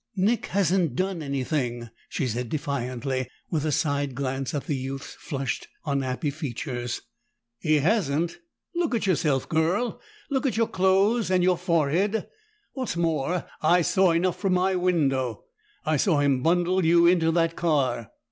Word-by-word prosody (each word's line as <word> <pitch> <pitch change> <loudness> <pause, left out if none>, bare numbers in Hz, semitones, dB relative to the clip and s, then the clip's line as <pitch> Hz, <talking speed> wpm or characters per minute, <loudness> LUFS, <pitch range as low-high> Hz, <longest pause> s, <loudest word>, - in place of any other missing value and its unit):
"Nick 210 +5 +1
hasn't 185 -7 +1
done 185 0 -1
anything," 130 -4 -2 0.2
she 140 - -2
said 120 0 -2
defiantly, 130 -3 -2 0.2
with 155 -4 0
a 155 - +1
side 145 -3 0
glance 135 0 -2
at 140 - -2
the 145 - -1
youth's 135 +1 -5
flushed, 135 -5 -4 0.2
unhappy 140 0 -1
features. 125 -4 -4 0.6
"He 155 -1 +2
hasn't? 165 -1 +1 0.3
Look 340 -7 0
at 220 - 0
yourself, 155 -8 +1
girl! 170 +9 0 0.3
Look 275 0 +1
at 245 - -1
your 230 -1 +2
clothes, 195 +5 +2
and 185 -1 +3
your 180 0 +4
forehead! 175 +5 +1 0.5
What's 255 -10 -3
more, 165 0 0 0.2
I 170 +3 +4
saw 190 +2 +3
enough 170 +1 +1
from 195 -2 +1
my 185 +1 +2
window; 140 - 0 0.4
I 155 -1 +2
saw 155 +1 +2
him 140 -3 +2
bundle 175 +4 +2
you 170 +1 +5
into 170 -2 +4
that 165 -1 +1
car!" 140 - 0
160 Hz, 150 wpm, -26 LUFS, 135-185 Hz, 0.6 s, you